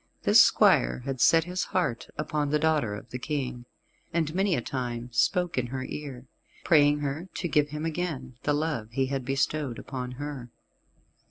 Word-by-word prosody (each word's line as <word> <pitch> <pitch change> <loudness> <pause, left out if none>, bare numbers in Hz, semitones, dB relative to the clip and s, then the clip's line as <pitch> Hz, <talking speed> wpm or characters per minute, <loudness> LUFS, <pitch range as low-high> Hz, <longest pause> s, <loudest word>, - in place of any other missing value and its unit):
This - - +7
squire - - +4
had 135 -3 -3
set 165 0 +6
his 180 +2 -3
heart 160 -11 -1
upon 150 -1 -1
the 150 - +2
daughter 150 -9 +1
of 105 - -11
the 125 - -4
King, 130 -4 -3 0.5
and 160 -2 0
many 190 0 +2
a - - 0
time 120 -2 -4
spoke 175 +2 +1
in 125 - -2
her 130 +1 -4
ear, 135 -3 -7 0.4
praying 145 -2 +4
her 145 +6 -3
to 175 - -2
give 150 -2 +2
him 150 +2 -4
again 155 -6 -3
the 145 - +1
love 145 -8 -2
he 130 +3 0
had 135 0 -3
bestowed 135 0 -1
upon 125 -2 -6
her. 140 -2 -6
145 Hz, 175 wpm, -27 LUFS, 125-155 Hz, 0.5 s, This